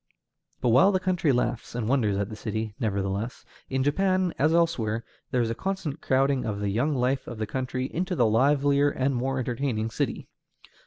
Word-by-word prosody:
But 125 - +2
while 130 - +6
the 185 - +1
country 180 -5 +1
laughs 120 -2 -1
and 120 -3 -2
wonders 115 -6 +2
at 100 0 -1
the 110 - -6
city, 110 0 -4
nevertheless, 100 +1 -2 0.2
in 130 0 0
Japan 185 +4 +1
as 150 +4 +4
elsewhere, 115 -10 +1 0.3
there 125 -2 +1
is 115 - -1
a - - 0
constant 170 -2 -4
crowding 135 0 +2
of 105 -2 -3
the 105 -1 -1
young 135 +9 +1
life 130 +1 0
of 120 - -6
the 110 - -2
country 130 +2 -3
into 180 +6 -2
the 120 - +3
livelier 140 +5 +3
and 135 0 0
more 130 +2 -1
entertaining 120 -3 -1
city. - - -2
130 Hz, 190 wpm, -26 LUFS, 115-145 Hz, 0.3 s, while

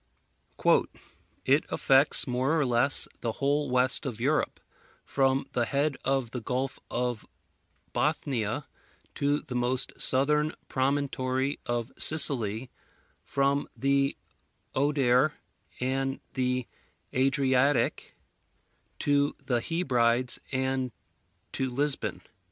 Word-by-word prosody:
"It 140 +3 +4
affects, 135 +2 +5
more 130 +5 0
or 145 - +2
less, 125 +3 +4
the 115 -2 -2
whole 145 +2 0
west 125 0 +3
of 125 -6 -5
Europe, 145 +6 0 0.5
from 135 0 +1
the 120 - 0
head 140 +3 0
of 135 -3 0
the 125 - -5
Gulf 130 +3 -3
of 120 -2 -2 0.7
Bothnia 140 -4 -1 0.5
to 145 +1 0
the 125 - -8
most 125 +1 -1
southern 150 +4 +2
promontory 135 0 -1
of 120 0 -2
Sicily, 125 -6 +1 0.5
from 140 +1 0
the 140 +2 +1 0.6
Oder 140 0 +2 0.4
and 135 +1 -1
the 125 -1 -1 0.5
Adriatic 135 -1 +1 0.9
to 145 0 +2
the 120 -3 0
Hebrides 125 -7 +1
and 130 -1 -1 0.6
to 130 -1 -2
Lisbon. 140 +3 -1
135 Hz, 100 wpm, -28 LUFS, 125-140 Hz, 0.9 s, affects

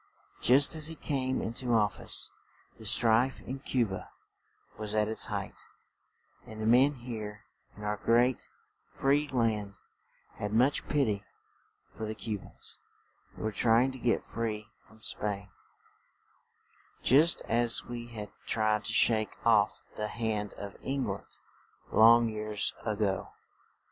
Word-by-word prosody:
Just 140 +5 +5
as 155 -1 +2
he 165 - -5
came 130 -4 -2
in 115 - -3
to 120 -1 0
of 105 -2 +3
fice, - - +1 0.5
the - - -4
strife 120 +3 +3
in 135 +2 -6
Cu 125 -2 +1
ba 95 -3 -7 0.7
was 105 0 -3
at 105 -1 +2
its 110 - +3
height; - - -5 0.8
and 110 0 -7
men 130 +6 +5
here 110 -4 -7 0.3
in 105 - -9
our 105 0 -1
great, 120 +4 +2 0.5
free 145 +2 +2
land 110 -6 -1 0.6
had 105 0 -4
much 125 +6 +2
pit 140 -3 +2
y 100 -1 -2 0.7
for 110 - -5
the 110 - -4
Cu 110 -1 -4
bans, - - -9 0.6
who - - -8
were 110 - -1
try 115 +3 +4
ing 135 - 0
to 130 - -9
get 120 -1 0
free 110 -2 -3
from 110 0 -20
Spain, 100 -2 -2 1.5
just 155 +6 +5
as 120 +1 +1
we 120 -1 -6
had 105 -4 -8 0.2
tried 110 -1 +1
to 110 - -1
shake 110 -2 +3
off 105 -3 +3
the 105 - -2
hand 105 -2 -3
of 100 -1 -8
Eng 135 0 -2
land - - -7 0.5
long 115 +1 +7
years 105 -1 -2
a 110 -2 -1
go. 100 -2 -1
115 Hz, 150 wpm, -30 LUFS, 105-125 Hz, 1.5 s, long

